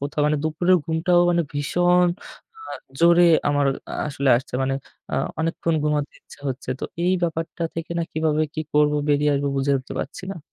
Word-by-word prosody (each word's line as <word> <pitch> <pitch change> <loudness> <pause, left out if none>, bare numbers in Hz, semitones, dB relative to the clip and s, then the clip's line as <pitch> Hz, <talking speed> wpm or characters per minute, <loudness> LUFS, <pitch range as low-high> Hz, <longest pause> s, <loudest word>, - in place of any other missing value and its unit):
কোথাও, 145 +2 -2
মানে 150 0 +2
দুপুরের 175 +4 +3
ঘুমটাও 170 +2 +2
মানে 170 -1 +2
ভীষণ 175 +5 +2 0.6
আ - - -5 0.3
জোরে 170 +1 +6 0.2
আমার 145 -1 +2 0.3
আ - - -3
আসলে 140 -1 0
আসছে, 130 +2 -6
মানে 135 0 0 0.4
আ - - +1 0.3
অনেকক্ষণ 165 0 -1
ঘুমাতে 150 -1 0
ইচ্ছা - - -17
হচ্ছে। 130 -1 -5
তো, - - -3 0.2
এই 180 - +3
ব্যাপারটা 165 0 -2
থেকে 165 0 -5
না - - +1
কিভাবে 155 -1 +1
কি 155 - -2
করবো? 150 0 +4
বেরিয়ে 145 0 +3
আসবো 140 0 0
বুঝে 135 +1 +1
উঠতে 130 - -9
পারছি 145 - -7
না। 195 - -8
155 Hz, 180 wpm, -23 LUFS, 145-170 Hz, 0.6 s, জোরে